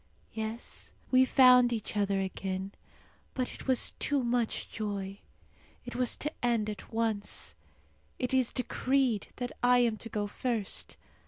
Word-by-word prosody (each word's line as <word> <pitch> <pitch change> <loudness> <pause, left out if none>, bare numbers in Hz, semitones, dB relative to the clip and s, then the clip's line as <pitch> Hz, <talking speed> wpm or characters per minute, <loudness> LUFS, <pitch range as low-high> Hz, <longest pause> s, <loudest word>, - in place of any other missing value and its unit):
Yes, 220 +1 -6 0.2
we 260 0 +6
found 250 -2 +6
each 225 -2 -3
other 200 -1 +1
again; 190 0 -3 0.6
but 255 -1 -2
it - - -11
was 260 -2 +4
too 285 -3 +1
much 240 -1 0
joy. 200 -2 -4 0.7
It - - -7
was 250 -1 +1
to 300 +1 -2
end 230 -3 +1
at 205 - -10
once. 225 -2 -2 0.6
It 250 0 -2
is 260 -2 +3
decreed 255 -2 0
that 245 -1 -4
I 245 0 +5
am 235 -3 +2
to 230 - -6
go 210 -1 -1
first. 220 -1 -2
235 Hz, 145 wpm, -30 LUFS, 210-250 Hz, 0.7 s, we